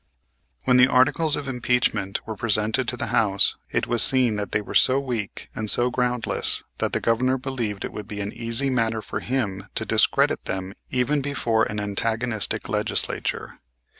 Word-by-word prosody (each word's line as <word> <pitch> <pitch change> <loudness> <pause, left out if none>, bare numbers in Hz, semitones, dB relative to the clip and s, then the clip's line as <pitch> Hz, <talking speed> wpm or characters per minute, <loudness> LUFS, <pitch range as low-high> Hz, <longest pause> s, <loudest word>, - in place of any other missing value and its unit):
When 125 - +4
the 125 0 +7
articles 145 +4 +3
of 140 - -5
impeachment 125 -6 0
were 110 - -5
presented 110 +3 0
to 125 - +2
the - - -2
House, 100 -5 +3
it - - 0
was 120 -2 +2
seen 125 -4 +3
that 105 -2 -4
they - - +2
were 105 - -7
so 130 +1 +4
weak 120 -7 -4
and 110 -1 -3
so 120 +3 +2
groundless 125 -1 0 0.2
that - - -1
the - - +1
Governor 130 +3 +2
believed 120 -6 -3
it - - -7
would 105 -1 -7
be 105 -1 -6
an 100 0 -4
easy 115 +4 -1
matter 115 -3 0
for - - -4
him 105 -6 -2
to - - -1
discredit - - +2
them 95 0 -4 0.2
even 130 +3 +1
before 120 -5 +1
an 105 - -4
antagonistic 110 +2 -1
legislature. - - -2
115 Hz, 175 wpm, -24 LUFS, 105-130 Hz, 0.2 s, the